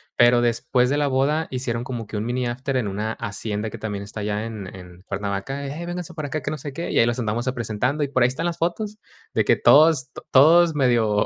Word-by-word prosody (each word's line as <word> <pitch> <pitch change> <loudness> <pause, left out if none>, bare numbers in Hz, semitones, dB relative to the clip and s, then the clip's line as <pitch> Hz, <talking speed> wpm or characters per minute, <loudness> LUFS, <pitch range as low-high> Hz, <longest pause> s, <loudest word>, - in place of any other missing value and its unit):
Pero 120 0 +5
después 120 +1 +1
de 140 - +1
la 145 -1 +1
boda 140 +4 +1
hicieron 125 -2 -2
como 120 -4 -5
que - - -8
un 105 +1 -2
mini 125 +1 -1
after 130 +3 -2
en 120 -5 -1
una 105 +3 -3
hacienda 105 +1 -4
que - - -8
también 105 -2 -4
está 105 +1 -7
allá 105 +1 -2
en 105 -4 -7
en 90 -1 -12
Cuernavaca, 100 +9 -4
y: - - -5
"Hey, 170 +3 -6
vénganse 175 -1 -5
para 155 -3 -5
acá, 155 +2 -3
que 140 - -3
no 155 - -3
sé 145 +1 -7
qué". 165 +5 -5
Y - - +2
ahí - - +6
los 120 +1 -1
andamos 115 +1 -1
a - - -2
presentando 125 +5 -1
y - - -5
por 130 -2 +1
ahí - - +6
están 130 +6 -4
las 175 -1 -2
fotos 205 +5 -2 0.4
de - - +2
que - - +3
todos, 150 -4 +5
to - - -11
todos 160 +4 +6
medio, 115 -6 +2
125 Hz, 255 wpm, -23 LUFS, 110-145 Hz, 0.4 s, ahí